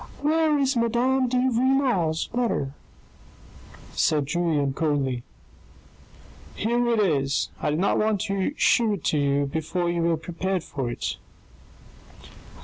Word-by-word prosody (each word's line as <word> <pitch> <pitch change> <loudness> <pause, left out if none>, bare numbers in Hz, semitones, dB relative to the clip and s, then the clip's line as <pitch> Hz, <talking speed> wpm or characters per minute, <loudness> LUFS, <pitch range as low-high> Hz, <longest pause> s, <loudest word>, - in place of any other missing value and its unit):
"Where 310 0 +2
is 275 -1 +1
Madame 245 +3 +2
de 250 +1 0
Renal's 250 - +1
letter? 230 - -1 0.6
" - - -20
said 150 -2 +1
Julien 150 -3 0
coldly. 140 -5 -1 0.9
" - - -22
Here 240 +3 0
it 230 -2 +2
is. 145 -8 +1
I - - 0
did 150 - 0
not 195 - +2
want 215 -1 +1
to 195 +7 -1
shew 230 -4 +3
it 200 - -5
to 150 - +1
you 140 0 +1
before 160 +4 -2
you 170 -1 -1
were 165 -1 +2
prepared 175 +2 -3
for 135 -6 -4
it." 120 - -4
185 Hz, 140 wpm, -25 LUFS, 150-240 Hz, 0.9 s, shew